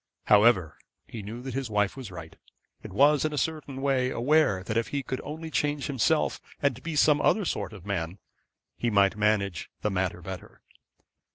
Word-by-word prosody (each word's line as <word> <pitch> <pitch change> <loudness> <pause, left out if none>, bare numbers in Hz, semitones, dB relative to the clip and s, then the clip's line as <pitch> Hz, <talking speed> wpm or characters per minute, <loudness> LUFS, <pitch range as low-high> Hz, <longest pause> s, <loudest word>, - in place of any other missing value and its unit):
However, 105 -6 +4 0.3
he 115 - -7
knew 110 +5 -7
that 130 -2 -5
his 135 -2 -3
wife 105 -2 +1
was 130 -5 -7
right, 80 -3 -9 0.5
and - - -8
was 140 +7 +4
in 155 -1 -1
a - - -3
certain 145 -3 -3
way 130 -2 +2
aware 125 -7 +2
that 110 - -4
if 115 0 +1
he 140 -1 -3
could 130 +1 -4
only 160 +2 -6
change 145 -1 0
himself 145 +3 +1 0.2
and 130 -3 0
be 165 -2 -4
another 155 +7 +3
sort - - -2
of 100 -4 -12
man, 95 -3 -3 0.6
he 120 - -1
might 100 -2 +3
manage 105 -5 0
the 105 - +1
matter 90 -2 -2
better. 95 0 -9
120 Hz, 180 wpm, -27 LUFS, 100-145 Hz, 0.6 s, However